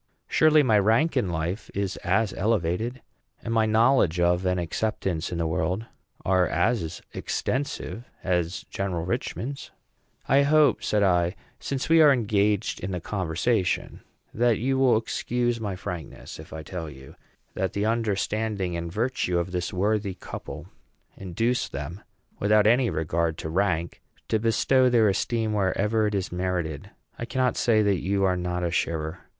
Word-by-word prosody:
Surely 155 -1 +5
my 110 -5 +4
rank 115 +10 +2
in 120 -8 +1
life 85 +5 -3
is 100 -1 -1
as 100 +3 0
elevated, 110 +4 -1 0.4
and 115 - -3
my 110 -1 +3
knowledge 110 - +3
of 90 +1 +2
and 90 0 +1
acceptance 90 -1 -2
in 85 - -3
the 85 - 0
world 90 +6 -1 0.4
are 95 -2 +3
as 85 0 -1
extensive, 130 -3 -3 0.2
as 90 -1 -1
General 90 -4 -2
Richman's." 125 +6 -4 0.6
"I 135 +2 +5
hope," 145 -2 +4
said 105 -1 +1
I, 90 -1 +2 0.2
"since 135 -1 -3
we 165 0 +6
are 150 -2 +8
engaged 105 -4 +1
in 95 - -4
the 90 -2 -3
conversation, 90 +2 -1 0.3
that 120 -1 +2
you 130 +3 0
will 130 -4 +5
excuse 120 +1 -1
my 100 -3 -3
frankness 90 -3 -7
if - - -11
I 80 0 -7
tell 80 -1 -6
you 65 -2 -12 0.4
that 95 -1 -2
the 100 +1 -1
understanding 110 -3 -1
and 85 0 -4
virtue 110 -4 -1
of 85 +1 -2
this 90 -1 -2
worthy 100 0 0
couple - - -8 0.5
induce 115 +7 -1
them, 75 +8 -6 0.4
without 105 +1 +4
any 120 +2 +4
regard 80 +1 -1
to 80 - -5
rank, 85 -1 -1 0.3
to 110 - +2
bestow 125 +3 +3
their 115 -4 +4
esteem 110 +2 0
wherever 105 +2 +1
it 105 - -2
is 95 -2 -2
merited. 90 -2 -3 0.3
I 120 - -3
cannot 130 0 0
say 110 -3 +3
that 100 -3 +1
you 100 +1 0
are 95 -1 +3
not 90 0 -2
a 85 - 0
sharer. 80 0 -2
100 Hz, 155 wpm, -26 LUFS, 90-115 Hz, 0.6 s, are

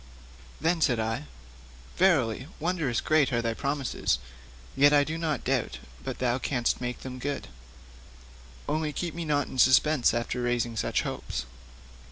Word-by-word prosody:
Then 165 +2 +1
said 120 -6 +3
I: 110 -7 -2 0.7
'Verily, 135 - +2
wondrous 160 -7 0
great 155 -3 +3
are 120 - +1
thy 115 -1 0
promises; 140 - -1 0.6
yet 145 +1 +6
I 145 -1 +6
do 155 +3 -3
not 160 -4 -2
doubt 130 -2 0 0.3
but - - -4
thou 125 0 0
canst 125 -3 0
make 125 0 -4
them 130 -1 -7
good: 140 - -3 1.2
only 155 -1 -1
keep 170 +1 -3
me 170 0 -4
not 145 -2 +1
in 130 - -7
suspense 130 +2 +5
after 120 +1 -2
raising 120 -1 0
such 110 - 0
hopes.' 60 - -4
135 Hz, 150 wpm, -28 LUFS, 120-155 Hz, 1.2 s, yet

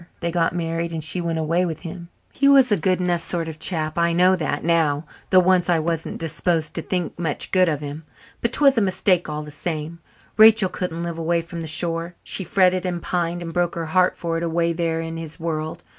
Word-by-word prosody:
They 170 0 -2
got 165 0 0
married 165 0 -2
and 160 -1 -3
she 160 +4 -1
went 165 -1 -2
away 165 +3 +1
with 165 -3 -3
him. 170 0 -8 0.2
He 275 - +2
was 270 -4 +6
a - - +5
good 185 +1 0
enough 175 -2 0
sort 170 -2 -2
of 160 -1 -7
chap. 155 -1 -1
I 170 0 +2
know 180 +2 +4
that 155 -4 -3
now, 160 -2 +1 0.2
though 185 - +6
once 180 -1 +2
I 175 - +4
wasn't 165 0 -2
disposed 165 0 -1
to 165 - -2
think 175 -1 -3
much 160 -4 -2
good 185 -2 +4
of 150 -2 -2
him. 145 +2 -6 0.4
But 235 - 0
'twas 275 -4 +4
a - - +1
mistake 185 -3 +1
all 150 0 -4
the 150 - -10
same; 160 +1 -5 0.4
Rachel 215 -3 +7
couldn't 170 -2 -4
live 170 -1 -4
away 165 +1 0
from 170 0 -7
the 160 - -5
shore. 165 +2 -1
She 190 - -2
fretted 185 +1 +2
and 180 -2 -2
pined 175 0 -2
and 165 -1 -6
broke 175 -1 0
her 165 -1 -3
heart 180 +3 +2
for 165 -1 -2
it 165 - -3
away 170 0 0
there 165 -1 -1
in 165 0 -5
his 165 0 -7
world. 160 0 -4
170 Hz, 230 wpm, -22 LUFS, 160-180 Hz, 0.4 s, Rachel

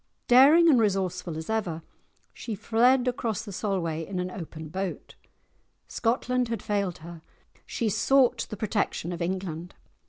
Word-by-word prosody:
Daring 285 +7 +7
and 280 -7 +6
resourceful 185 -5 -1
as 160 - -6
ever, 185 -8 -2 0.5
she 225 - -6
fled 245 +5 +3
across 235 -4 -2
the 205 - -7
Solway 175 -6 -2
in 185 +3 -6
an 180 0 -3
open 160 -3 -8
boat; 190 +2 -5 0.7
Scotland 250 +1 0
had 230 -3 -4
failed 200 -4 -1
her, 170 -1 -10 0.5
she 235 - -2
sought 245 +5 +2
the 215 - -6
protection 205 -4 -2
of 175 - -6
England. 175 -1 -4
200 Hz, 145 wpm, -27 LUFS, 175-235 Hz, 0.7 s, Daring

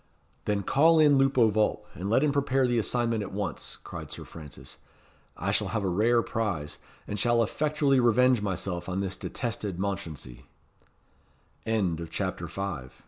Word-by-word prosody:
"Then 100 -1 0
call 160 - +4
in 145 -3 +6
Lupo 135 -4 +4
Vulp, 110 0 +1
and 95 +4 -4
let 125 +6 +3
him 150 - +3
prepare 135 -2 +2
the 120 -1 +2
assignment 115 0 0
at 100 - -5
once," 95 -5 -4
cried - - -8
Sir - - -8
Francis. 75 -6 -11 0.6
"I - - -1
shall 105 - +1
have 105 +2 -2
a - - 0
rare 115 +6 +3
prize; 95 -10 -3 0.3
and 105 - -3
shall 120 +2 +3
effectually 145 +2 +1
revenge 125 0 +4
myself 95 -2 -3
on 95 +1 -1
this 95 -1 -3
detested 105 -6 -4
Mounchensey." 80 -10 -5 1.6
CHAPTER 95 0 -3
VI. 85 -7 -4
105 Hz, 150 wpm, -28 LUFS, 95-125 Hz, 1.6 s, in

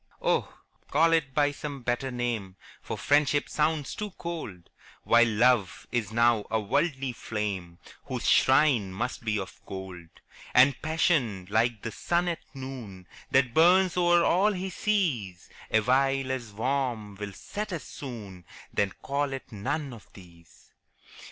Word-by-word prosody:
Oh, - - 0 0.4
call 165 +3 +4
it 140 -5 +1
by 145 -1 +3
some 145 -2 -7
better 120 +2 -1
name, 120 -6 -3 0.3
For - - -5
Friendship 145 0 +2
sounds 150 -2 0
too 210 0 -4
cold, 160 - -6 0.3
While 120 0 +5
Love 115 -2 +2
is 115 -5 -1
now 115 -1 +3
a 110 - +1
worldly 135 +5 0
flame, 100 -7 -4 0.3
Whose - - -3
shrine 130 -7 +4
must 120 +6 -4
be 110 -1 0
of 95 -2 -7
gold: 95 -3 -7 0.5
And 130 +1 +5
Passion, 155 - +1
like 110 0 +1
the 115 - -3
sun 175 +9 0
at 170 - -3 0.2
noon, 125 -9 -8 0.2
That 130 -3 +3
burns 180 +4 +5
o'er 175 -1 +4
all 200 +5 +3
he 190 0 -4
sees, 145 - -1 0.2
Awhile 130 +4 +2
as 120 -5 -4
warm 120 -2 -2
will 100 -1 -6
set 210 - -6
as 170 -4 -4
soon 105 -10 -8 0.3
Then 100 -2 +1
call 140 0 -1
it 135 -1 -7
none 130 +7 -3
of 115 - -14
these. 85 -4 -18
125 Hz, 145 wpm, -28 LUFS, 105-150 Hz, 0.5 s, While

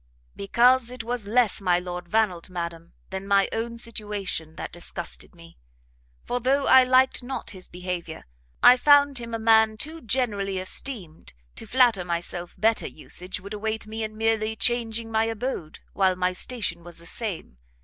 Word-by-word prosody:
"Because 240 +5 +3
it 250 -2 -6
was 235 -2 -3
less 230 -1 +2
my 180 -2 +3
Lord 180 0 -5
Vannelt, 195 -6 +1
madam, 170 -2 -6 0.2
than 190 +1 -5
my 200 -1 +4
own 235 +1 -3
situation, 205 -8 -3
that - - -6
disgusted 175 +1 -6
me: 165 - -16 0.7
for 245 - -1
though 270 +3 +2
I 260 - +8
liked 255 +1 +3
not 255 +2 -5
his 185 -2 -9
behaviour, 180 -2 -6 0.4
I 250 +1 +9
found 285 0 +5
him 230 -1 -5
a - - -1
man 220 -1 +4
too 320 +8 -5
generally 205 -5 -1
esteemed 185 - -4 0.2
to - - -9
flatter 245 -7 +4
myself 175 0 -3
better 225 +1 +2
usage 180 +5 -6
would 200 +2 -8
await 220 +1 -3
me 220 +1 -6
in 215 0 -4
merely 220 0 +1
changing 230 -1 0
my 220 0 +2
abode, 225 -8 -4 0.2
while 190 -1 +2
my 180 0 0
station 185 -5 -3
was 175 0 -10
the 170 - -12
same. 175 - -5
215 Hz, 165 wpm, -25 LUFS, 180-235 Hz, 0.7 s, I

